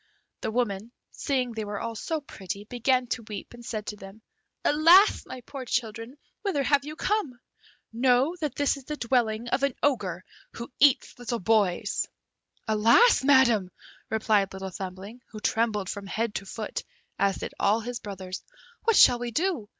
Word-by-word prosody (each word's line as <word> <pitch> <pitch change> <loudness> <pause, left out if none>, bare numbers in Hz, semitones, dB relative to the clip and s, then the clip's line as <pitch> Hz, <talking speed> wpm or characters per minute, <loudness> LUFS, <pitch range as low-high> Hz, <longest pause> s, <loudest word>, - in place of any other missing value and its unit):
The - - -2
woman, 220 -2 -2 0.2
seeing 255 -3 -1
they 220 -1 -4
were 205 -1 -4
all 230 - -4
so 315 +7 -3
pretty, 200 -7 -7
began 250 +2 +1
to 240 - -2
weep, 210 +1 -7
and 240 0 -12
said 215 -3 -4
to 210 - -5
them, 195 +2 -13 0.4
"Alas! 335 +7 +6
my 255 - -8
poor 270 +2 -8
children, 230 +1 -3 0.2
whither 370 -9 0
have 280 +1 +3
you 300 +2 -7
come? 335 - -1 0.5
Know 255 +6 +3
that 305 -5 -3
this 285 0 +1
is 270 - -12
the 300 +1 -5
dwelling 235 -2 0
of 255 - 0
an 280 -2 +1
Ogre 195 -11 0 0.3
who 235 +3 -8
eats 275 -2 +3
little 240 0 -2
boys!" 205 -3 +1 0.6
"Alas, 230 - +5
Madam!" 250 -9 +4 0.4
replied 215 -3 +2
Little 190 0 -6
Thumbling, 190 +6 -8
who 215 - -9
trembled 215 -3 0
from 200 +1 -5
head 225 +2 -2
to 195 - -5
foot, 215 +1 -5 0.4
as 200 -1 +2
did - - -6
all 210 +3 +3
his 240 +1 -5
brothers; 190 -4 -7 0.4
"what 455 -1 +4
shall 245 -8 +7
we 245 0 -3
do? 300 - -1
235 Hz, 170 wpm, -27 LUFS, 210-270 Hz, 0.6 s, shall